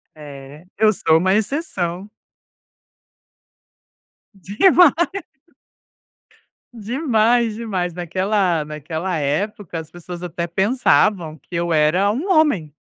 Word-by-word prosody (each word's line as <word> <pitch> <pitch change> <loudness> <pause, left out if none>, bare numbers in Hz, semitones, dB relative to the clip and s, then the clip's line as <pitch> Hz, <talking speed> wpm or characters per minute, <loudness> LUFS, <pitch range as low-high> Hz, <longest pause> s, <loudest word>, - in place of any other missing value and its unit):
É, 145 +1 -12
eu 215 0 +4
sou 160 -5 +2
uma 185 +3 +1
exceção. 200 - -2 2.2
Demais. 255 - +4 1.8
Demais, 235 -1 +1
demais. 190 -6 -3
Naquela 180 0 -1
naquela 160 +4 -4
época, 170 +5 -3
as 160 -1 -10
pessoas 175 +1 -9
até 170 0 -4
pensavam 190 -3 +1
que 175 - -21
eu 170 0 -1
era 160 +6 +2
um 285 - -4
homem, 285 - +2
185 Hz, 95 wpm, -20 LUFS, 160-215 Hz, 2.2 s, eu